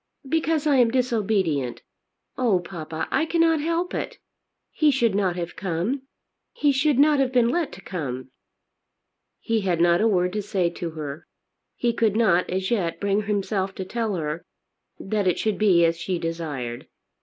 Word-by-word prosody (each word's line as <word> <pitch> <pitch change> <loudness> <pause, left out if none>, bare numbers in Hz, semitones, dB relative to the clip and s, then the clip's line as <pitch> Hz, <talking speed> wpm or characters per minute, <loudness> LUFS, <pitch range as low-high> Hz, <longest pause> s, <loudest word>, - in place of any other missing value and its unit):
"Because 320 0 0
I 290 -3 +4
am 245 -2 +5
disobedient. 205 - 0 0.5
Oh, 230 -8 +2
papa, 165 -3 -5
I 320 - +1
cannot 330 -2 +3
help 335 +3 -1
it. - - -4 0.5
He 305 - +3
should 240 -6 +2
not 190 -3 +1
have 175 -1 -5
come. 190 +9 -2 0.5
He 290 - +2
should 275 0 +2
not 295 +1 +5
have 265 -2 +2
been 245 -2 +3
let 335 +2 0
to 195 - -11
come." 130 -9 -5 1.1
He 225 -2 0
had 180 -4 0
not 175 +1 +4
a 225 - +4
word 180 -3 +1
to 210 - -1
say 185 -4 0
to 170 -1 -5
her. 150 +1 -6 0.5
He 240 -1 0
could 225 -3 +1
not 195 -6 +3
as 190 +2 -2
yet 185 -8 0
bring 200 +1 0
himself 195 -2 -1
to 190 - -5
tell 220 0 -2
her, 160 0 -3 0.6
that 205 0 -1
it 180 - +2
should 215 -2 -1
be 185 -5 +5
as 165 0 +1
she 180 +2 -2
desired. 150 -8 -4
195 Hz, 170 wpm, -24 LUFS, 170-245 Hz, 1.1 s, am